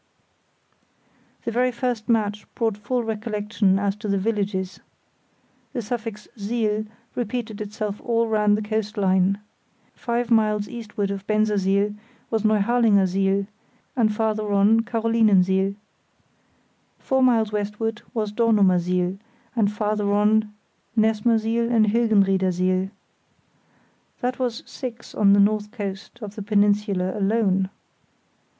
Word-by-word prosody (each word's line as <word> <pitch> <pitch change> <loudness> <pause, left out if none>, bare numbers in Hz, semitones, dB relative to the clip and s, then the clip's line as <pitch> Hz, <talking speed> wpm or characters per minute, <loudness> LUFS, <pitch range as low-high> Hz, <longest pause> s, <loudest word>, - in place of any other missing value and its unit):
The 235 - -1
very 250 +2 +2
first 245 -2 -3
match 210 -2 0
brought 225 -3 0
full 240 +4 -2
recollection 210 -2 0
as 200 0 0
to 210 - -6
the 200 -1 +1
villages. 195 -2 -2 0.9
The 245 -4 -3
suffix 225 -1 -5
siel 215 0 -1 0.3
repeated 230 -3 -4
itself 210 0 -4
all 230 -1 +1
round 210 -1 +3
the 215 - -3
coast 215 0 -3
line. 190 0 +2 0.5
Five 240 0 -2
miles 215 -2 +2
eastward 210 -4 -4
of 200 0 -6
Bensersiel 205 -1 +1 0.4
was 225 -1 +1
Neuharlingersiel, 200 -3 +2 0.5
and 225 -4 +3
farther 215 -1 -1
on 200 +3 +4
Carolinensiel. 215 -5 +2 1.2
Four 265 0 0
miles 230 -4 +3
westward 210 +1 -2
was 215 -4 -2
Dornumersiel; 185 -4 +2 0.4
and 210 -3 +2
farther 210 -1 -1
on 210 +1 +3 0.5
Nessmersiel 225 +1 +2
and 225 -2 +4
Hilgenriedersiel. 190 -4 +2 1.3
That 250 0 -2
was 245 -3 -2
six 240 -3 -8
on 200 -2 +4
the 200 - +5
north 210 +1 +2
coast 200 -4 -6
of 205 -1 -6
the 215 - -7
peninsula 205 -2 +1
alone. 195 -2 +1
210 Hz, 115 wpm, -23 LUFS, 200-225 Hz, 1.3 s, the